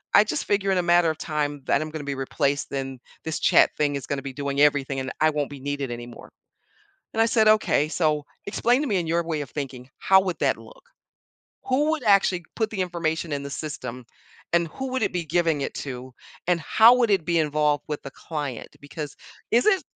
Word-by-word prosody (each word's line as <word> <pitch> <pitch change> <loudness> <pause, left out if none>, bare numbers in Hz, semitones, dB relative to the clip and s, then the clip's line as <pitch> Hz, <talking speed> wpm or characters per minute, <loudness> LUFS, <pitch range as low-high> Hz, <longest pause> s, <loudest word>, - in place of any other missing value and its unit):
I - - +8
just - - -2
figure 200 -1 +1
in 190 - +2
a - - 0
matter 175 -1 +4
of 155 - -2
time 145 -2 -2
that 140 - +2
I'm 155 - -4
gonna 155 -1 -5
be 140 - -2
replaced, 140 +1 -1
then 135 -2 -4 0.2
this 160 0 -3
chat-thing 145 -1 +3
is 140 - -4
gonna 140 -1 -2
be 135 - -5
doing 140 0 -2
everything 140 -2 +3
and 130 0 -4
I 155 - +5
won't 145 -1 -2
be 145 - -9
needed 145 -1 -3
anymore," 120 0 -9 0.8
and 225 - +2
I - - +5
said, 220 -1 +3
"Okay, 215 -8 +3
so 155 -3 +1 0.2
explain 240 +6 +2
to 295 - -1
me 205 - +1
in 170 -2 -2
your 170 +1 +1
way 160 -2 -2
of 140 - -7
thinking, 130 -3 -6
how 190 0 +5
would 185 -2 -3
that - - +2
look? - - -15 0.8
Who 275 +4 +2
would 315 -5 -2
actually 195 -4 +3
put 220 -1 0
the 200 -4 -4
information 165 -2 -2
in 140 -1 -2
the 140 - -6
system, 130 -5 -6 0.5
and 170 -1 +2
who 265 +10 -5
would 260 - -1
it - - +1
be 175 -2 -2
giving 160 -2 +1
it - - -4
to, 130 -2 -6 0.3
and 175 -1 +2
how 225 +9 +6
would 240 -3 +2
it 190 -5 +2
be 170 0 +1
involved 150 -1 +1
with 150 -1 -3
the 140 - -8
client? 145 -6 -5
Because 145 0 -7 0.3
is 240 +2 +3
it" 390 -3 +4
155 Hz, 220 wpm, -25 LUFS, 140-190 Hz, 0.8 s, I